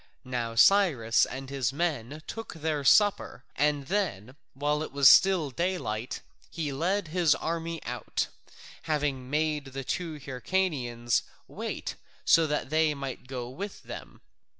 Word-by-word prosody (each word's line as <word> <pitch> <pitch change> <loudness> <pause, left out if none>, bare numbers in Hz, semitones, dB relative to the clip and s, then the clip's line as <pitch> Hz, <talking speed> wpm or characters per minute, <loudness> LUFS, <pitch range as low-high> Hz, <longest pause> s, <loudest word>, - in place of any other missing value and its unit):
Now 120 -2 -3
Cyrus 135 - +5
and 135 +1 -7
his 135 -5 0
men 150 -2 -2
took 225 -5 -7
their 155 -2 -2
supper 205 +7 +3
and 145 -1 +1
then 135 - -2 0.2
while 145 +2 0
it 155 - -5
was 140 -1 +5
still 180 -7 +5
daylight 150 - -2 0.3
he 155 -4 -3
led 175 +5 0
his 165 -3 +3
army 165 +1 -3
out, - - -2 0.6
having 140 -4 -1
made 150 0 0
the 135 0 -6
two 165 +4 -3
Hyrcanians 130 - -1 0.3
wait - - -5 0.3
so 165 -1 +5
that 150 -1 -2
they 155 -1 +3
might 135 -2 -6
go 125 -2 -5
with 195 +11 -7
them. - - -9
150 Hz, 135 wpm, -28 LUFS, 130-165 Hz, 0.6 s, Cyrus